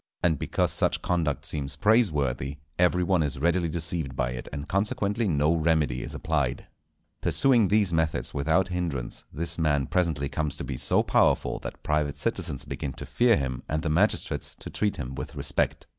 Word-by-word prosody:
And 80 -5 +2
because - - 0
such - - +1
conduct 80 -5 -1
seems 70 -2 -1
praiseworthy, 75 - +1 0.2
every 90 0 +3
one 90 -1 +2
is 70 -3 -1
readily 85 +3 +1
deceived 80 -3 -1
by 60 -1 -1
it, 60 - -7
and 70 +1 -6
consequently 105 +2 0
no 75 -1 +2
remedy 80 -6 +1
is - - -6
applied. 70 -6 -1 0.6
Pursuing 120 -6 +4
these 100 -3 +2
methods 80 -1 0
without 80 +6 +1
hindrance, 85 -9 -3
this 85 +3 -1
man 75 -4 +2
presently 80 -4 0
comes 75 +1 -2
to - - -4
be 65 - -4
so - - +3
powerful - - +2
that - - -8
private 75 -2 0
citizens 70 - -2
begin 70 - -5
to - - -7
fear 120 -2 +3
him, 65 -3 -3
and 80 +1 -1
the 80 - -1
magistrates 95 +7 0
to - - -9
treat 105 -1 -1
him 65 -3 -5
with - - -7
respect. - - 0
80 Hz, 175 wpm, -27 LUFS, 70-90 Hz, 0.6 s, Pursuing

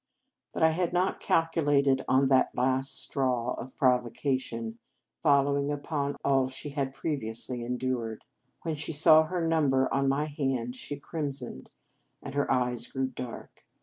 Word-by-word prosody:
But - - -2
I 160 - +7
had 175 +1 -1
not 180 +2 +1
calculated 145 -5 +2
on 135 +1 +4
this 130 -1 +5
last 130 +2 +1
straw 125 -3 0
of 130 - -8
provocation 125 -3 0 0.4
following 140 -1 +3
upon 145 -1 -2
all 135 -2 +3
she 130 +3 -6
had 140 -2 -2
previously 125 -4 -3
endured. 120 -2 -3 0.4
When 165 - -1
she 155 +2 -3
saw 160 +1 +7
her 175 +1 -2
number 140 -5 +2
on 135 0 +2
my 140 +2 +1
hand, 135 -5 -2
she 145 +2 -6
crimsoned, 140 - -5 0.5
and 140 - -8
her 145 0 0
eyes 125 -2 0
grew 130 -1 -2
dark. 125 -2 -9
135 Hz, 145 wpm, -29 LUFS, 125-145 Hz, 0.5 s, I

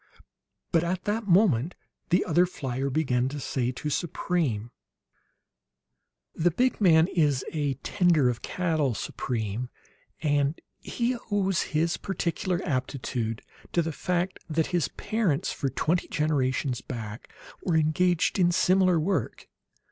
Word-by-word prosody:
But 165 -2 +3
at 180 +1 -2
that 210 +1 -2
moment 175 - +3 0.3
the 180 +3 +3
other 175 +2 +3
flier 135 -5 -3
began 130 -3 +1
to 145 +1 -5
say 125 -2 -1
to 150 +4 -4
Supreme: 145 -8 -1 1.6
"The 170 +2 +2
big 250 +8 0
man 160 -4 +6
is 150 -7 +1
a 145 -3 0
tender 175 -8 +3
of 120 -1 -1
cattle, 160 -8 0
Supreme; 115 +1 -3 0.5
and 145 0 +1 0.2
he 240 0 -2
owes 195 -3 +1
his 165 +2 0
peculiar 180 -1 -2
aptitude 125 -4 -2 0.3
to 170 - +3
the 165 - -2
fact 180 +4 -2
that 160 0 +1
his 170 -6 +2
parents, 195 -4 -1
for 135 - -2
twenty 165 +7 0
generations 140 -3 0
back, 110 -3 -7 0.3
were 175 - 0
engaged 170 +4 +2
in 175 -1 +4
similar 185 -1 +3
work. 190 +5 -2
160 Hz, 125 wpm, -27 LUFS, 135-180 Hz, 1.6 s, man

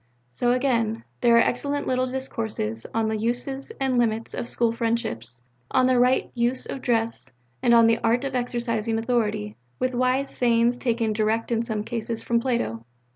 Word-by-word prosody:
'" 125 0 -42
So, 240 - +1
again, 235 -3 +1 0.2
there 235 -1 +5
are - - +7
excellent 285 +4 -1
little 255 0 +1
discourses 220 - -3
on 225 -1 0
the 220 0 -1
Uses 245 - -2
and 265 -2 +2
Limits 225 -1 0
of 235 - -4
School 235 -1 +1
Friendships, 225 - -3 0.3
on 255 - +3
the 255 -1 +3
Right 250 +1 +3
Use 245 +1 0
of 270 - -6
Dress, 230 - -1 0.3
and 240 - +3
on 230 -1 +7
the 230 0 +3
Art 235 +3 +1
of 275 -1 -3
Exercising 235 -3 -1
Authority, 220 - -1 0.2
with 255 0 -1
wise 255 +2 0
sayings 235 0 +2
taken 230 -3 0
direct 220 +2 0
in 230 -1 +2
some 220 -3 -2
cases 230 0 -3
from 235 0 +1
Plato. 230 - -1
235 Hz, 180 wpm, -25 LUFS, 225-250 Hz, 0.3 s, are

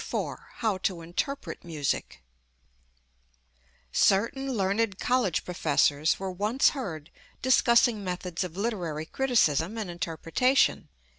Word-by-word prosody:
IV - - -3 0.2
How 215 -5 -1
to 185 -2 -2
Interpret 225 +12 -4
Music 145 - -3 1.7
Certain 230 - +2
learned 200 0 0
college 245 -9 0
professors 150 -3 +1
were 190 -1 -3
once 210 +8 +2
heard 170 - -6 0.3
discussing 235 -4 +4
methods 180 -1 -3
of 180 -1 -7
literary 180 -8 -2
criticism 215 - +1
and 210 -5 -4
interpretation. 170 +10 +1
190 Hz, 100 wpm, -27 LUFS, 165-230 Hz, 1.7 s, discussing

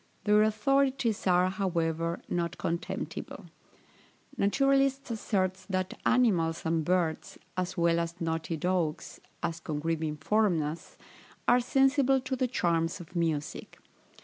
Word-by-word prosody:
Their 210 0 +4
authorities 235 +1 +1
are, 180 0 +4
however, 170 -3 -1
not 170 -1 -2
contemptible. 170 +1 -4 0.9
Naturalists 275 +4 +2
assert 190 -4 -1
that 185 -1 -1
animals 185 -10 +2
and 165 0 +1
birds, 170 -1 -1 0.2
as 185 +1 -3
well 170 0 +3
as 170 +1 -4
"knotted 165 0 -2
oaks," 175 -4 -1 0.2
as 165 0 -2
Congreve 160 +1 -2
informs 160 +3 +1
us, 150 +3 -6 0.5
are 245 - +6
sensible 270 +1 +3
to 260 +1 -3
the 255 0 0
charms 170 -8 0
of 175 +1 -12
music. 160 -3 -2
180 Hz, 120 wpm, -29 LUFS, 165-225 Hz, 0.9 s, are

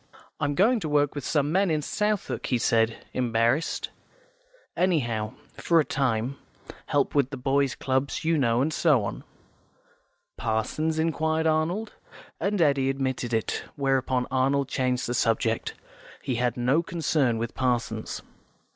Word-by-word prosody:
"I'm 145 0 0
going 225 - +4
to 160 - -4
work 145 -1 +2
with 145 - -5
some 145 +1 +1
men 190 +2 +2
in 155 -2 0
Southwark," 210 +4 -1
he 125 - +1
said, 115 -1 +1
embarrassed. 120 +4 0 0.8
"Anyhow, 120 - 0 0.2
for 170 -1 +3
a 155 - +2
time. 130 -1 -1 0.5
Help 145 -1 +1
with 140 -3 +2
boys' 135 0 0
clubs, 135 +4 -1
you 165 0 +3
know, 125 -4 +2
and 155 +2 -1
so 150 -10 +3
on." - - -5 1.1
"Parsons?" 115 +9 -1
inquired 160 0 0
Arnold, 165 +7 0 0.5
and 200 0 0
Eddy 140 -4 +3
admitted 130 -3 -2
it, 110 -2 -1
where 135 -2 +2
upon 125 -1 -1
Arnold 135 +1 +2
changed 125 -1 0
the 120 - -2
subject; 115 -1 0 0.5
he 130 - -1
had 125 0 0
no 125 +6 +2
concern 155 -8 0
with 115 0 -3
Parsons. 125 -2 -2
135 Hz, 140 wpm, -26 LUFS, 120-155 Hz, 1.1 s, going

